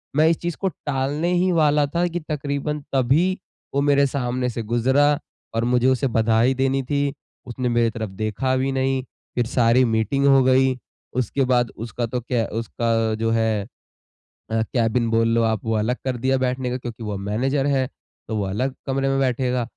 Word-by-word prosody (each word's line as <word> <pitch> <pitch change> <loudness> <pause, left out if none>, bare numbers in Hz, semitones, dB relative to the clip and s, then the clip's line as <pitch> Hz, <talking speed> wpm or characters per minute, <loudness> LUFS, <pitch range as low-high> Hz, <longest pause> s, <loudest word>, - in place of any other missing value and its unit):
मैं 155 +2 +5
इस 165 - +2
चीज़ 170 -1 -2
को 195 - +1 0.2
टालने 145 +5 -1
ही 180 +1 +2
वाला 150 -3 +3
था 175 +1 +2
कि 175 0 -3
तकरीबन 150 -1 -3
तभी 150 +9 +2 0.4
वो 140 - +2
मेरे 140 -1 +4
सामने 125 -2 -2
से 115 0 -4
गुज़रा 130 +6 +2 0.4
और 115 - +1
मुझे 125 +1 +2
उसे 130 +1 +2
बधाई 115 +3 +3
देनी 135 +1 +1
थी। 140 +1 -1 0.3
उसने 125 +1 -2
मेरी 120 -1 +2
तरफ 110 -1 -5
देखा 110 +6 -1
भी 135 +1 0
नहीं। 135 0 0 0.3
फ़िर 120 - +1
सारी 120 0 +3
मीटिंग 115 +5 +1
हो 135 -1 +6
गई। 130 0 +3 0.4
उसके 130 +2 0
बाद 120 -2 +2
उसका 115 +1 -3
तो 125 +2 -3
क्या 120 -1 -1
उसका 115 0 -1 0.2
जो 115 +1 -1
है 110 -3 0 0.8
अ, 110 0 +1
केबिन 115 0 0
बोल 115 0 +2
लो 115 0 +3
आप 110 -2 0
वो 115 - 0
अलग 110 +4 0
कर 130 -2 -1
दिया 130 +2 +1
बैठने 130 0 -1
का 125 - -2
क्योंकि 120 -2 -7
वो 105 - -3
अब 100 - -4
मैनेजर 130 +8 0
है 135 -2 +1 0.4
तो 110 - -3
वो 100 - 0
अलग 125 +8 -2
कमरे 135 0 0
में 135 0 +1
बैठेगा। 125 -1 0
130 Hz, 190 wpm, -22 LUFS, 115-135 Hz, 0.8 s, हो